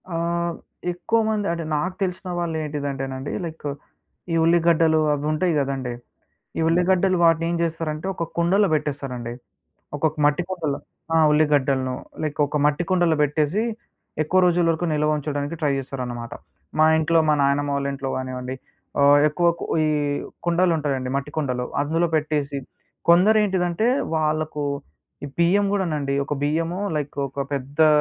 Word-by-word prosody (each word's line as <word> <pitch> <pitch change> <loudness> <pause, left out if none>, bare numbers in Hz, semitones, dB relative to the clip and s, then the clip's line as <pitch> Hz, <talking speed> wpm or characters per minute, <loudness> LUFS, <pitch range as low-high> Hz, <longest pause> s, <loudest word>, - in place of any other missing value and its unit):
ఆ! 170 - -4
హ్మ్. 170 0 -1 0.4
ఎక్కువ 200 +6 0
మంది 210 -2 0
అంటే, 170 0 -3
నాకు 180 +5 -1
తెలిసిన 185 0 -3
వాళ్ళేంటిదంటేనండీ 145 -5 -3
లైకు, 155 -3 -5 0.6
ఈ - - +2
ఉల్లిగడ్డలు 165 -1 +4
అవుంటాయి 155 +4 0
గదండీ! 135 -3 -2 0.7
ఈ - - +1
ఉల్లిగడ్డలు 180 +2 +3
వాటినేం 165 +1 +3
జేస్తారంటే, 165 0 -2
ఒక 170 - -2
కుండలో 190 +4 +3
బెట్టేస్తారండి. 135 -5 -3 0.6
ఒకొక్క 155 +1 0
మట్టి 150 +4 +2
కుండలో 160 -7 -2 0.4
ఆ! - - +5
ఉల్లిగడ్డలను. 140 -4 +2 0.3
లైకొక 150 -1 0
మట్టి 150 +4 +2
కుండలో 175 -3 +3
బెట్టేసీ, 150 +7 +1 0.6
ఎక్కువ 185 +5 +2
రోజుల 175 -1 +3
వరకు 165 +2 -2
నిల్వ 150 0 +1
ఉంచడానికి 145 +1 -3
ట్రై 150 -2 +2
జేస్తారన్నమాట. 125 -3 -5 0.5
మా 155 - +7
ఇంట్లో, 165 +1 +3
మా - - +5
నాయనమ్మ 140 +1 +1
వాళ్ళింట్లో 140 -1 -2
గానివ్వండి, 130 0 -4 0.5
ఆహ్, 140 +1 +7
ఎక్కువ 150 +3 +1
కు - - -4 0.2
ఈ - - +2 0.6
కుండలుంటాయండి, 160 -7 +1
మట్టి 140 +1 -3
కుండలు. 125 -5 -1 0.2
అందులో 165 +4 +1
పెట్టేసి 150 -2 -1 0.5
కొందరేంటిదంటే, 190 +1 +4 0.3
వాళ్లకు 155 -1 -1 0.6
ఈ - - -5
బియ్యం 185 +4 +4
గూడానండి, 155 -8 -1
ఒక 140 - -2
బియ్యము 165 +5 0 0.2
లైకు 145 -1 -3
ఒక 140 +2 -4
పెద్దా 140 +3 +2
155 Hz, 130 wpm, -23 LUFS, 140-170 Hz, 0.7 s, మా